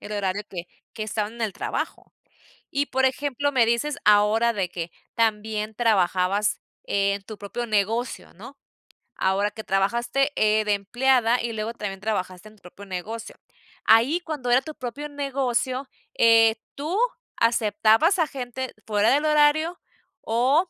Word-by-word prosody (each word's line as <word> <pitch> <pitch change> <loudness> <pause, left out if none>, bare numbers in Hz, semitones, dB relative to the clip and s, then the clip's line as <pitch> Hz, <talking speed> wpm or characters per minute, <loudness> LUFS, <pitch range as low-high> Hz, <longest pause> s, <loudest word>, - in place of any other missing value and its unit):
el 210 - -8
horario 200 0 -1
que 180 -2 -7 0.3
que 215 - -5
estaban 215 0 -3
en 235 - -12
el 215 - -1
trabajo. - - -4 0.6
Y, 285 +1 0
por 265 +1 0
ejemplo, 285 +1 0
me 250 -5 +3
dices 235 +6 0
ahora 210 +3 +4
de 195 -5 -2
que 170 -1 -6 0.2
también 215 -1 0
trabajabas 200 -2 +1 0.2
en 200 0 0
tu 215 0 -9
propio 205 +4 -5
negocio, 220 +3 -1
¿no? 240 +10 -12 0.6
Ahora 195 +2 +1
que 220 +1 -8
trabajaste, 235 +9 +1
eh, 215 0 +2
de 210 - +2
empleada 240 +4 +2
y 235 0 -3
luego 220 +1 -3
también 195 -3 -5
trabajaste 190 -2 -3
en 215 - -20
tu 205 - -26
propio 185 +3 -12
negocio, 210 +5 -6 0.5
ahí 245 +10 +5
cuando 295 -7 -4
era 250 +2 +5
tu 310 +3 -8
propio 275 +2 -6
negocio, 270 -2 -2 0.3
eh, 225 -1 +6 0.2
¿tú 310 +7 -3 0.4
aceptabas 225 - +3
a 330 - +3
gente 260 -1 -5
fuera 210 +1 +3
del 290 +3 +2
horario 305 +3 +3 0.4
o 265 +10 +2
225 Hz, 150 wpm, -24 LUFS, 205-265 Hz, 0.6 s, eh